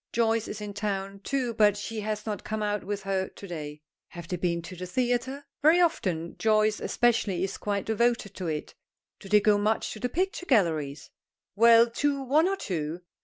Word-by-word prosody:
Joyce 225 -1 +1
is 210 - -6
in 205 -1 -5
town, 200 -1 -3
too, 250 +2 -2
but 210 -2 +4
she 220 +2 -5
has 210 0 -3
not 210 -2 -4
come 215 0 -3
out 210 -1 -1
with 200 +1 -4
her 190 -1 -1
to 200 - -11
day. 150 -3 -7 0.2
Have 170 -2 -10
they 180 - -2
been 170 -1 -1
to 185 - -8
the 180 +1 -6
theatre? 255 +6 -1 0.2
Very 315 +4 +6
often; 180 - 0
Joyce, 215 -1 +3
especially, 220 -7 +1
is 195 0 -3
quite 200 -1 -2
devoted 225 -2 +1
to 185 -3 -5
it. 155 -2 -4 0.5
Do 195 - -11
they 210 0 +5
go 205 0 +4
much 215 +2 0
to 215 - -9
the 250 - -1
picture 360 +3 -2
galleries? 160 - +1 0.4
Well, 230 +2 +7
to 280 +4 0
one 300 +6 +3
or 390 +1 0
two. 165 - -4
210 Hz, 195 wpm, -27 LUFS, 190-235 Hz, 0.5 s, Well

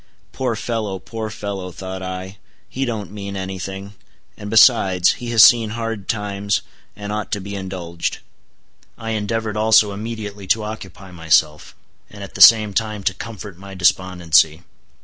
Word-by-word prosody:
Poor 125 -3 -2
fellow, 110 -4 -3
poor 110 +4 -6
fellow! 100 -3 -6
thought 95 +1 -7
I, 95 +1 -6 0.3
he 135 +1 -3
don't 110 -5 -4
mean 100 -1 -7
any 95 0 -5
thing; 95 +2 -7 0.4
and 105 - -8
besides, 105 -5 +5
he 120 - -5
has 115 -2 +7
seen 115 -3 +6
hard 115 -4 -4
times, 100 -1 -1 0.3
and 105 0 -6
ought 105 -1 -4
to 105 - -1
be 100 +1 -7
indulged. 95 -3 -4 0.8
I 115 0 -5
endeavored 110 0 -2
also 110 -1 +4
immediately 105 -1 -6
to 110 +3 +2
occupy 95 -3 -8
myself, 80 -3 +1 0.3
and 100 -1 -10
at 100 - -10
the - - -5
same 110 -3 +8
time 110 -1 -2
to 95 - +1
comfort 100 -3 -9
my 100 0 -10
despondency. 85 -3 +2
100 Hz, 155 wpm, -20 LUFS, 95-110 Hz, 0.8 s, same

